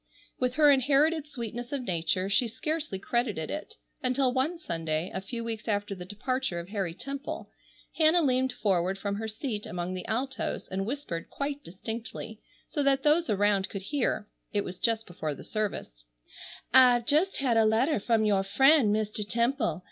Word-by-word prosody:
With 250 0 0
her 300 -1 +6
inherited 285 +3 +3
sweetness 240 -3 -6
of 280 -3 -2
nature 185 -1 0
she 205 +5 +3
scarcely 305 - -3
credited 215 -5 -1
it, 310 +9 -6 0.3
until 255 0 +2
one 275 +7 0
Sunday, 165 - -2
a 190 - -3
few 230 +4 -5
weeks 225 -1 -4
after 205 -1 -1
the 180 -2 -8
departure 235 0 -2
of 170 +2 -8
Harry 195 -5 -2
Temple, 275 +7 -6 0.5
Hannah 320 +2 +5
leaned 260 -1 +2
forward 190 -3 0
from 200 0 -3
her 220 +1 -3
seat 220 -1 -4
among 175 +1 -3
the 185 - -6
altos 255 +4 -2
and 195 +1 -3
whispered 235 - -4
quite 285 0 -4
distinctly, 220 +3 -7 0.3
so 295 - -2
that 275 -1 +2
those 315 +3 +3
around 205 -1 +2
could 195 -1 -6
hear—it 210 -5 -2
was 180 0 -7
just 225 -1 +1
before 155 -4 -4
the - - -11
service—"I've 215 - 0
just 320 +9 +2
had 255 -4 +1
a 225 - +5
letter 225 +6 +3
from 220 +1 +2
your 200 -2 +3
friend 265 +4 +5
Mr. 215 0 -1
Temple. 235 - 0
225 Hz, 165 wpm, -29 LUFS, 195-270 Hz, 0.5 s, her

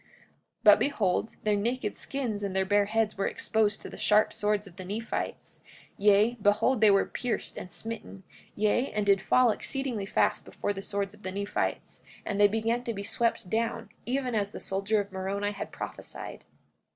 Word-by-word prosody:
44:18 - - -31 0.6
But - - +8
behold, 220 -6 0
their 210 -1 +2
naked 225 +2 -1
skins 245 -7 -3
and 195 -2 -3
their 190 0 +2
bare 205 +1 +3
heads 215 -1 0
were 195 - +1
exposed 215 -1 0
to - - -6
the - - -10
sharp 210 0 +4
swords 210 0 0
of 185 -3 -13
the 185 - -6
Nephites; 215 +5 -4 0.3
yea, 210 +4 +4
behold 215 +4 +3
they 215 - +7
were 195 -1 +4
pierced 245 -3 -3
and 180 - -7
smitten, 220 -2 -7 0.3
yea, 215 +5 +1
and 210 -1 0
did 200 -1 +4
fall 245 +4 +4
exceedingly 245 -4 -2
fast 210 +1 +1
before 205 - -3
the 195 - -6
swords 200 0 -3
of 210 - -17
the 185 - -4
Nephites; 200 +1 -3 0.2
and 205 -1 -1
they 205 - +9
began 225 +3 0
to 230 - -2
be 200 - -4
swept 230 -1 0
down, 225 +2 -1 0.2
even 255 0 -1
as 205 -2 0
the - - -8
soldier 200 +3 0
of 200 -1 -4
Moroni 195 +2 -2
had 200 - -6
prophesied. - - -7
210 Hz, 190 wpm, -29 LUFS, 200-225 Hz, 0.6 s, they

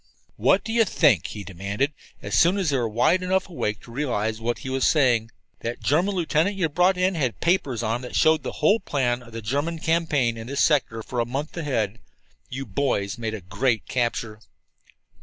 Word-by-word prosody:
"What 190 - +3
do 225 - -4
you 230 -1 +5
think?" 145 - +3
he 105 - -7
demanded, 100 - -2 0.3
as - - -5
soon 175 +4 +4
as 185 -7 0
they 135 - +2
were 120 -3 0
wide 125 +12 +2
enough 185 +1 0
awake 105 - -3
to 120 - -14
realize 115 -5 -2
what 120 +1 -1
he - - -3
was 135 0 0
saying. 120 -7 +3 0.3
"That 115 +1 -4
German 180 +8 +1
lieutenant 170 +2 +1
that - - -7
you 165 -4 +1
brought 180 +5 +3
in 185 +1 +2
had 135 -9 -1
papers 145 - +1
on 115 +1 0
him - - -11
that 125 - -7
showed 160 0 +4
the - - -5
whole 205 +8 +5
plan 125 - -1
of 120 -1 -14
the 115 -1 -7
German 145 +9 -1
campaign 155 -8 +1
in 115 0 -7
this 140 +2 -3
sector 130 -8 +2
for 125 - -4
a 120 - +1
month 140 +5 -4
ahead. 120 - -2 0.5
You 135 +2 -5
boys 100 -3 -1
made 110 -1 -3
a 105 - -8
great 110 +6 -1
capture." 115 -3 -2
130 Hz, 210 wpm, -24 LUFS, 115-165 Hz, 0.5 s, you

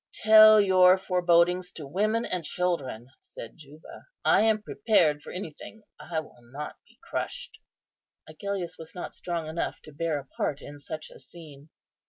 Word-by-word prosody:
"Tell 215 0 +8
your 185 -2 +5
forebodings 180 -1 +2
to 155 - -8
women 215 +10 0
and 180 -2 -3
children," 145 -8 -3
said 115 - -11
Juba; 150 0 -14 0.2
"I - - +5
am 220 -1 +2
prepared 160 -13 +1
for - - -10
anything. 185 +4 -9 0.2
I 165 -2 -4
will 125 -5 -18
not 135 +6 -8
be - - -25
crushed." - - -5 0.7
Agellius 180 +2 -5
was 160 +2 -11
not 180 - -7
strong 170 -2 -4
enough 160 +2 -4
to 155 - -12
bear 160 0 -2
a 140 - -7
part 140 +1 -3
in 145 0 -11
such 155 +2 -8
a - - -14
scene. 155 -3 -14
170 Hz, 160 wpm, -27 LUFS, 150-185 Hz, 0.7 s, Tell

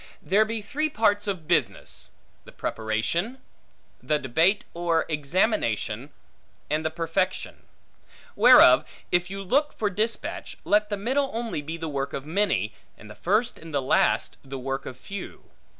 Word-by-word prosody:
There 205 +3 +3
be 220 -1 -4
three 305 +9 -1
parts 205 -4 +2
of 180 -6 -3
business; 170 -1 -1 0.3
the - - -13
preparation, 115 - -2 0.6
the 150 - +1
debate 160 - +2
or 170 -1 +1
examination, 145 - 0 0.6
and 155 +1 +1
the 160 - 0
perfection. 165 +3 -2 0.7
Whereof, - - +8 0.3
if 175 +1 +2
you 195 +1 -5
look 285 +10 +1
for 210 -2 -1
dispatch, 220 +5 -3
let 210 0 +3
the 205 - -1
middle 265 +7 0
only 230 -9 -2
be 160 +3 -5
the 165 -1 -4
work 140 -2 -3
of 135 - -4
many, 155 - 0 0.2
and 105 0 -12
the - - -11
first 215 +6 0
and 165 0 -10
last 135 -2 +2
the 135 0 -7
work 135 +1 -4
of 125 - -7
few. 195 +10 -9
175 Hz, 150 wpm, -26 LUFS, 140-210 Hz, 0.7 s, Whereof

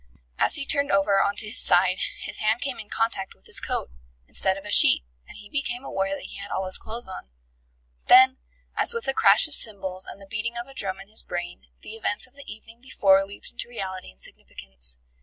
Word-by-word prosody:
As - - +4
he 280 - 0
turned 285 -1 +1
over 195 0 +3
on 200 - 0
to 215 - +2
his 210 +4 +1
side 185 +1 +5 0.2
his - - -4
hand 215 +2 +1
came 270 -2 -3
in 210 - -10
contact 225 -4 -1
with - - -32
his - - +2
coat, - - -3 0.4
instead 190 0 -1
of 195 - -11
a 205 - -5
sheet, - - +7 0.2
and - - -13
he 205 - -12
became 250 0 -3
aware 195 -5 -2
that - - -10
he - - -9
had 200 0 -8
all 190 - -2
his 185 - -1
clothes 230 +1 -6
on. 185 - -9 0.8
Then, 260 +1 +7 0.4
as 470 - +3
with 465 - -4
a 270 - +2
crash 200 +3 +5
of 305 - -5
cymbals 190 -6 +1
and - - -10
the 195 - -13
beating 225 +4 -4
of 240 - -5
a 270 - -15
drum 195 -6 -5
in 195 - -12
his 220 +2 -6
brain, 175 0 -7 0.2
the - - -9
events 210 -2 -2
of 255 - -22
the 280 0 -11
evening 225 +2 -14
before 195 -7 +3
leaped 200 - -12
into 240 - -7
reality 190 -6 -6
and 60 - -20
significance. 60 -2 -6
205 Hz, 230 wpm, -25 LUFS, 190-240 Hz, 0.8 s, sheet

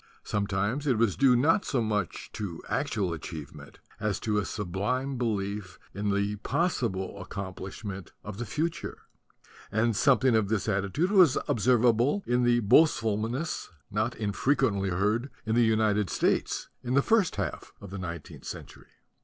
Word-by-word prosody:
Sometimes 105 +7 -1
it 125 -5 +3
was 110 -4 +2
due 135 -2 +5
not 160 - +3
so 135 - 0
much 105 -5 -2
to 95 -6 -5
actual 105 - -1
achievement 75 -3 -8 0.2
as 105 -2 -1
to 105 -1 +1
a 100 - -2
sublime 110 +9 -2
belief 105 -5 -2 0.2
in 105 +1 -2
the 100 +1 0
possible 100 - -1
accom 95 -1 -6
plishment 100 -2 -7
of 105 0 -7
the 120 - -2
future; 160 +10 -3 0.7
and 110 +1 +2
something 130 +1 +4
of 110 -3 +2
this 110 -2 0
attitude 100 - 0
was 180 -9 +6
observable 120 - +3
in 125 +1 +2
the 120 0 +3
boastfulness 115 +2 +2 0.2
not 110 +3 0
infrequently 105 -1 +1
heard 105 +8 0 0.2
in 110 - 0
the 120 - +4
United 110 -3 +2
States - - 0
in 125 +1 -1
the 140 - +4
first 220 -6 +3
half - - -4
of 100 - -10
the 100 - -5
nineteenth 85 -4 -7
century. - - -9
110 Hz, 150 wpm, -28 LUFS, 100-125 Hz, 0.7 s, was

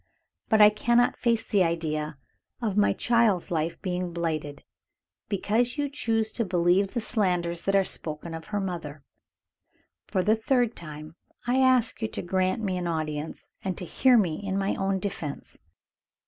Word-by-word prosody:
But 220 -1 +5
I 210 0 +9
cannot 240 +3 +2
face 235 -2 +1
the 200 -3 +3
idea 155 -3 -2 0.4
of 220 -5 -2
my 205 0 +4
child's 230 -8 +2
life 165 0 -1
being 180 -2 -2
blighted, 155 -4 -3 0.7
because 225 +6 0
you 290 -1 0
choose 225 -5 -1
to 235 - -1
believe 185 +1 +2
the - - +2
slanders 180 -7 -1
that 195 - +2
are 195 - +5
spoken 160 -2 -4
of 160 0 -7
her 205 -1 -2
mother. 165 -7 -5 1.0
For 185 - 0
the 215 +4 +4
third 240 0 +1
time 155 0 -9 0.3
I 245 +2 +1
ask 255 -3 +3
you 220 - 0
to - - -6
grant 185 +5 0
me 185 -3 -1
an 175 - -3
audience, 155 -2 -3 0.2
and 190 -2 -2
to 180 - -4
hear 255 +7 +4
me 180 -5 +1
in 195 -1 -2
my 195 0 0
own 195 0 0
defense." 180 -7 -5
190 Hz, 165 wpm, -27 LUFS, 170-220 Hz, 1.0 s, I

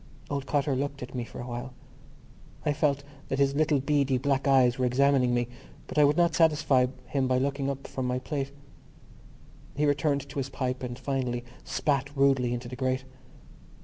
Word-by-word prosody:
Old 140 -1 -2
Cotter 145 -1 +1
looked 140 0 -3
at 125 - -9
me 125 -2 -2
for - - -10
a 120 - -5
while. 125 +1 -6 0.9
I 150 - +2
felt 140 -1 +1 0.2
that 135 - -1
his 140 0 +3
little 150 0 +2
beady 140 -1 +2
black 140 +1 0
eyes 130 -2 +4
were 130 - +2
examining 130 0 +3
me 120 -1 +1 0.4
but - - -2
I - - +7
would 145 +2 +4
not 170 -1 +4
satisfy 150 -6 +4 0.2
him 135 0 0
by 130 0 +2
looking 140 +1 0
up 135 0 -4
from 130 -1 -3
my 125 0 0
plate. 135 +1 -3 1.2
He 150 +2 +1
returned 145 -1 +1
to 140 +1 -5
his 135 0 -3
pipe 130 -1 -3
and 120 -1 -5
finally 125 -3 -2 0.2
spat 140 -2 0
rudely 135 -3 +3
into 120 0 -3
the 125 - -6
grate. 130 0 -1
135 Hz, 185 wpm, -28 LUFS, 125-140 Hz, 1.2 s, I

